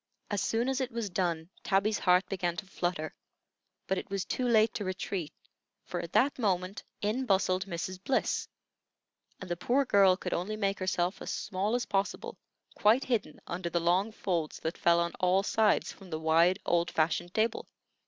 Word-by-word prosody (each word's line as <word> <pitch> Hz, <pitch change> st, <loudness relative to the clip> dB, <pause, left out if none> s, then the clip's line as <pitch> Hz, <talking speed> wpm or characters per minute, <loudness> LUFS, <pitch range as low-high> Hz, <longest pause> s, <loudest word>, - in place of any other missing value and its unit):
As 205 Hz, -, 0 dB
soon 230 Hz, +2 st, 0 dB
as 265 Hz, 0 st, 0 dB
it 255 Hz, 0 st, -2 dB
was 230 Hz, -4 st, -3 dB
done 175 Hz, -2 st, -1 dB
Tabby's 205 Hz, +2 st, +1 dB
heart 180 Hz, 0 st, +4 dB
began 175 Hz, -3 st, -2 dB
to -, -, -5 dB
flutter; 175 Hz, -4 st, -3 dB, 0.7 s
but 190 Hz, -1 st, 0 dB
it -, -, -9 dB
was 195 Hz, -1 st, -2 dB
too 255 Hz, -, -1 dB
late 220 Hz, -1 st, +4 dB
to 210 Hz, -, -3 dB
retreat, 185 Hz, -3 st, -3 dB, 0.5 s
for 175 Hz, -, -4 dB
at 170 Hz, -1 st, -6 dB
that 275 Hz, +1 st, +3 dB
moment 190 Hz, -2 st, 0 dB, 0.2 s
in 240 Hz, +6 st, 0 dB
bustled 190 Hz, -1 st, +2 dB
Mrs. 185 Hz, +1 st, -5 dB
Bliss, 265 Hz, +5 st, 0 dB, 0.9 s
and 190 Hz, -, -8 dB
the 175 Hz, -, -1 dB
poor 260 Hz, +10 st, +1 dB
girl 195 Hz, -5 st, +5 dB
could 180 Hz, -, -4 dB
only 205 Hz, +5 st, -2 dB
make 200 Hz, -2 st, 0 dB
herself 185 Hz, -1 st, -1 dB
as -, -, -5 dB
small 200 Hz, +3 st, -1 dB
as 245 Hz, -, -1 dB
possible, 200 Hz, -, -2 dB, 0.3 s
quite 225 Hz, +6 st, +4 dB
hidden 215 Hz, -11 st, -1 dB
under 175 Hz, 0 st, -4 dB
the 170 Hz, -, 0 dB
long 180 Hz, +6 st, +2 dB
folds 170 Hz, -7 st, -2 dB
that 160 Hz, +2 st, -2 dB
fell 170 Hz, 0 st, +3 dB
on 170 Hz, 0 st, 0 dB
all 185 Hz, +2 st, +3 dB
sides 215 Hz, 0 st, +2 dB
from 195 Hz, -2 st, -14 dB
the 155 Hz, -2 st, -3 dB
wide, 165 Hz, +3 st, +4 dB
old 170 Hz, 0 st, +2 dB
fashioned 175 Hz, +2 st, 0 dB
table. 225 Hz, +1 st, 0 dB
190 Hz, 185 wpm, -30 LUFS, 175-215 Hz, 0.9 s, girl